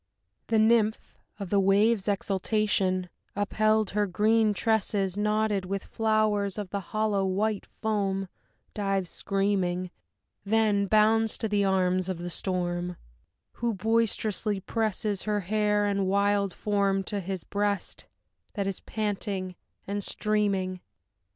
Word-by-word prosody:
The 225 Hz, -, +2 dB
Nymph, 220 Hz, 0 st, +4 dB, 0.4 s
of 195 Hz, -3 st, -6 dB
the 200 Hz, -, +4 dB
waves' 200 Hz, +2 st, +3 dB
exultation 195 Hz, -2 st, 0 dB, 0.3 s
upheld, 215 Hz, +1 st, +1 dB
her 210 Hz, 0 st, +1 dB
green 215 Hz, +3 st, +3 dB
tresses 205 Hz, -3 st, 0 dB
Knotted 210 Hz, -1 st, +1 dB
with 195 Hz, +1 st, -3 dB
flowers 215 Hz, -3 st, +1 dB
of 205 Hz, -3 st, -5 dB
the 200 Hz, -, -1 dB
hollow 210 Hz, 0 st, 0 dB
white 200 Hz, +2 st, -1 dB
foam, 195 Hz, -3 st, -2 dB, 0.5 s
dives 195 Hz, -3 st, -1 dB
screaming; 190 Hz, -3 st, -1 dB, 0.5 s
Then 205 Hz, -1 st, +2 dB
bounds 220 Hz, +1 st, +3 dB
to 220 Hz, -, -1 dB
the 205 Hz, -1 st, +1 dB
arms 185 Hz, -1 st, +1 dB
of 185 Hz, -, -2 dB
the 175 Hz, +1 st, -5 dB
storm, 175 Hz, -1 st, -2 dB, 0.6 s
who 235 Hz, -2 st, -1 dB
boisterously 215 Hz, -1 st, 0 dB
presses 210 Hz, -1 st, -1 dB
Her 210 Hz, -1 st, -1 dB
hair 210 Hz, +2 st, +1 dB
and 200 Hz, -2 st, 0 dB
wild 200 Hz, 0 st, +2 dB
form 200 Hz, -1 st, 0 dB
to 205 Hz, +2 st, -3 dB
his 190 Hz, -1 st, -4 dB
breast 205 Hz, -1 st, -2 dB, 0.5 s
that 200 Hz, -2 st, -1 dB
is 195 Hz, -1 st, -2 dB
panting 200 Hz, -3 st, -3 dB, 0.3 s
and 200 Hz, +1 st, -3 dB
streaming. 195 Hz, -4 st, 0 dB
205 Hz, 125 wpm, -27 LUFS, 190-215 Hz, 0.6 s, Nymph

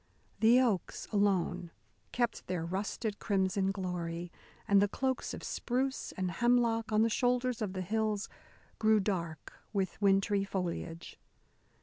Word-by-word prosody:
The 230 Hz, +3 st, +6 dB
oaks 225 Hz, -9 st, 0 dB
alone 185 Hz, -4 st, +1 dB, 0.4 s
kept 240 Hz, -1 st, -1 dB
their 180 Hz, -3 st, -2 dB
rusted 200 Hz, +4 st, -3 dB
crimson 190 Hz, -1 st, +1 dB
glory, 175 Hz, -3 st, -4 dB, 0.4 s
and 200 Hz, -1 st, +5 dB
the 205 Hz, -, +4 dB
cloaks 260 Hz, +5 st, -1 dB
of -, -, -7 dB
spruce 260 Hz, +2 st, -2 dB
and 185 Hz, -1 st, -2 dB
hemlock 230 Hz, +1 st, +2 dB
on 215 Hz, +1 st, +4 dB
the -, -, +4 dB
shoulders 245 Hz, +1 st, +1 dB
of 200 Hz, -3 st, -2 dB
the 185 Hz, -1 st, -3 dB
hills 215 Hz, +1 st, 0 dB, 0.5 s
grew 220 Hz, 0 st, +5 dB
dark 170 Hz, -6 st, -3 dB, 0.2 s
with 195 Hz, 0 st, -1 dB
wintry 195 Hz, 0 st, +3 dB
foliage. 175 Hz, -3 st, -4 dB
200 Hz, 130 wpm, -32 LUFS, 185-225 Hz, 0.5 s, The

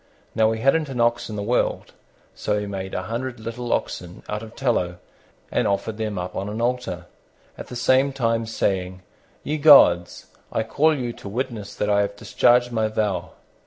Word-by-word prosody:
Now, 110 Hz, 0 st, +3 dB
he 110 Hz, 0 st, -3 dB
hadn't 145 Hz, +4 st, +2 dB
an 130 Hz, -2 st, -5 dB
ox 120 Hz, 0 st, +1 dB
in 110 Hz, -, -5 dB
the 100 Hz, -, -3 dB
world, 120 Hz, +4 st, -1 dB, 0.4 s
so 105 Hz, -, -1 dB
he 105 Hz, -, -4 dB
made 95 Hz, -1 st, -5 dB
a 95 Hz, -, -2 dB
hundred 120 Hz, +4 st, -4 dB
little 115 Hz, +2 st, -5 dB
oxen 90 Hz, 0 st, -3 dB
out 105 Hz, 0 st, -3 dB
of 110 Hz, 0 st, -11 dB
tallow 100 Hz, -10 st, 0 dB, 0.5 s
and -, -, +1 dB
offered 105 Hz, +2 st, -1 dB
them 105 Hz, -3 st, -2 dB
up 90 Hz, 0 st, -5 dB
on 100 Hz, +1 st, -3 dB
an 105 Hz, +2 st, -5 dB
altar, 120 Hz, -7 st, -2 dB, 0.5 s
at -, -, -9 dB
the 125 Hz, -, -8 dB
same 130 Hz, +3 st, +3 dB
time 115 Hz, -4 st, 0 dB
saying, 95 Hz, -4 st, -2 dB, 0.4 s
"Ye 150 Hz, +1 st, -2 dB
gods, 90 Hz, -, +6 dB, 0.3 s
I 110 Hz, -, 0 dB
call 150 Hz, +7 st, +2 dB
you 120 Hz, -2 st, -3 dB
to 100 Hz, -, -9 dB
witness 110 Hz, -2 st, -4 dB
that 105 Hz, -, -1 dB
I 100 Hz, 0 st, +3 dB
have 100 Hz, 0 st, -2 dB
discharged 120 Hz, +2 st, +3 dB
my 110 Hz, -2 st, +1 dB
vow." 105 Hz, -3 st, -2 dB
110 Hz, 190 wpm, -23 LUFS, 100-125 Hz, 0.5 s, gods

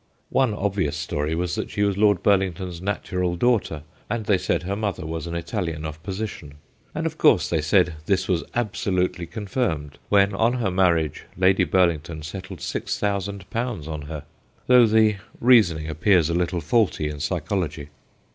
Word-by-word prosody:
One 130 Hz, -6 st, +2 dB
obvious 100 Hz, -7 st, -1 dB
story 75 Hz, +2 st, -2 dB
was 85 Hz, +1 st, -2 dB
that 110 Hz, -, -3 dB
she 105 Hz, -, -1 dB
was 100 Hz, -1 st, +1 dB
Lord 105 Hz, -2 st, +3 dB
Burlington's 95 Hz, -3 st, +1 dB
natural 90 Hz, -2 st, -2 dB
daughter, 100 Hz, -8 st, +1 dB, 0.3 s
and 110 Hz, 0 st, -2 dB
they 100 Hz, -3 st, +3 dB
said 90 Hz, -, -1 dB
her 95 Hz, +3 st, -2 dB
mother 100 Hz, -6 st, -3 dB
was 80 Hz, 0 st, -4 dB
an 85 Hz, -, -5 dB
Italian 85 Hz, -4 st, -3 dB
of 80 Hz, 0 st, -6 dB
position. 95 Hz, -6 st, -6 dB, 0.4 s
And, 160 Hz, +1 st, -2 dB
of 160 Hz, -1 st, -3 dB
course, 90 Hz, -, +5 dB
they 80 Hz, -3 st, 0 dB
said 90 Hz, +3 st, +3 dB
this 95 Hz, -1 st, +1 dB
was 90 Hz, -3 st, +1 dB
absolutely 90 Hz, -6 st, -1 dB
confirmed 100 Hz, -, -3 dB
when 100 Hz, 0 st, +4 dB
on 115 Hz, +5 st, +2 dB
her 115 Hz, -7 st, -1 dB
marriage 85 Hz, -5 st, +1 dB
Lady 95 Hz, +1 st, +4 dB
Burlington 85 Hz, -4 st, +1 dB
settled 95 Hz, +1 st, -8 dB
6000 100 Hz, -1 st, -2 dB
on 90 Hz, -, -3 dB
her, 75 Hz, -2 st, -6 dB, 0.4 s
though 125 Hz, -2 st, +6 dB
the 110 Hz, -1 st, +4 dB, 0.2 s
reasoning 95 Hz, -11 st, +4 dB
appears 80 Hz, +1 st, +2 dB
a -, -, 0 dB
little 85 Hz, 0 st, 0 dB
faulty 85 Hz, -3 st, +1 dB
in 75 Hz, -1 st, -5 dB
psychology. 80 Hz, -1 st, -2 dB
95 Hz, 160 wpm, -24 LUFS, 80-105 Hz, 0.4 s, though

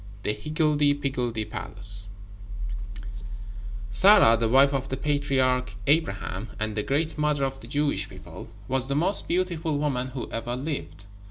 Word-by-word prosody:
The 105 Hz, -, 0 dB
Higgledy 150 Hz, +4 st, +1 dB
Piggledy 125 Hz, -6 st, -2 dB
Palace 105 Hz, -1 st, -2 dB, 1.8 s
Sarah, 115 Hz, -, +7 dB
the 115 Hz, 0 st, 0 dB
wife 135 Hz, +3 st, +5 dB
of 135 Hz, -1 st, -2 dB
the 130 Hz, -, -2 dB
patriarch 130 Hz, -5 st, 0 dB
Abraham, 110 Hz, -, 0 dB
and 110 Hz, 0 st, -2 dB
the 105 Hz, -, 0 dB
great 150 Hz, +7 st, -1 dB
mother 150 Hz, -2 st, +1 dB
of 135 Hz, 0 st, -2 dB
the 115 Hz, -, -12 dB
Jewish 145 Hz, +3 st, 0 dB
people, -, -, -11 dB, 0.2 s
was 130 Hz, 0 st, 0 dB
the 140 Hz, -, -1 dB
most 180 Hz, +7 st, +4 dB
beautiful 170 Hz, -4 st, -1 dB
woman 135 Hz, -4 st, -1 dB
who 130 Hz, -1 st, -6 dB
ever 120 Hz, +2 st, -3 dB
lived. 130 Hz, -, -5 dB
135 Hz, 145 wpm, -26 LUFS, 115-150 Hz, 1.8 s, Sarah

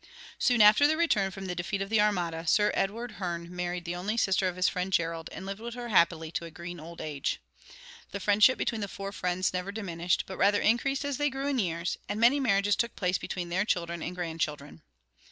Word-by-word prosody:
Soon 240 Hz, -3 st, +4 dB
after 215 Hz, +8 st, +7 dB
their 315 Hz, +1 st, +1 dB
return 215 Hz, -13 st, +2 dB
from 195 Hz, 0 st, -8 dB
the 180 Hz, -, -3 dB
defeat 180 Hz, +3 st, -3 dB
of 195 Hz, +1 st, -4 dB
the 220 Hz, -2 st, +4 dB
armada, 175 Hz, -5 st, 0 dB
Sir 210 Hz, +6 st, +4 dB
Edward 230 Hz, +5 st, -2 dB
Hearne 170 Hz, -1 st, -4 dB
married 175 Hz, 0 st, -3 dB
the 175 Hz, 0 st, -3 dB
only 200 Hz, +6 st, -2 dB
sister 190 Hz, -3 st, +2 dB
of 180 Hz, -, -3 dB
his 185 Hz, 0 st, +2 dB
friend 180 Hz, +1 st, -2 dB
Gerald, 165 Hz, -2 st, -1 dB
and 190 Hz, -, -8 dB
lived 195 Hz, +1 st, -5 dB
with 235 Hz, +1 st, -6 dB
her 240 Hz, -1 st, -6 dB
happily 170 Hz, -5 st, +3 dB
to 170 Hz, -, -3 dB
a -, -, -7 dB
green 170 Hz, +1 st, -8 dB
old 165 Hz, +2 st, -10 dB
age. 145 Hz, -3 st, -3 dB, 0.7 s
The 200 Hz, -, -5 dB
friendship 210 Hz, +6 st, +5 dB
between 225 Hz, -2 st, -1 dB
the 200 Hz, -, -2 dB
four 195 Hz, 0 st, -6 dB
friends 180 Hz, -1 st, -1 dB
never 180 Hz, +2 st, -3 dB
diminished, 175 Hz, -5 st, -1 dB
but 190 Hz, -, -8 dB
rather 205 Hz, +1 st, +4 dB
increased 270 Hz, +5 st, +1 dB
as 285 Hz, -3 st, -2 dB
they 290 Hz, 0 st, +1 dB
grew 270 Hz, 0 st, -4 dB
in 280 Hz, -3 st, 0 dB
years, 170 Hz, -3 st, -2 dB
and 210 Hz, -, -2 dB
many 245 Hz, +5 st, +5 dB
marriages 205 Hz, -5 st, +2 dB
took 235 Hz, -1 st, -1 dB
place 180 Hz, -1 st, 0 dB
between 175 Hz, -2 st, -4 dB
their 185 Hz, +3 st, +1 dB
children 170 Hz, -4 st, -2 dB
and 180 Hz, -, -4 dB
grandchildren. 160 Hz, -, -4 dB
190 Hz, 225 wpm, -29 LUFS, 175-215 Hz, 0.7 s, after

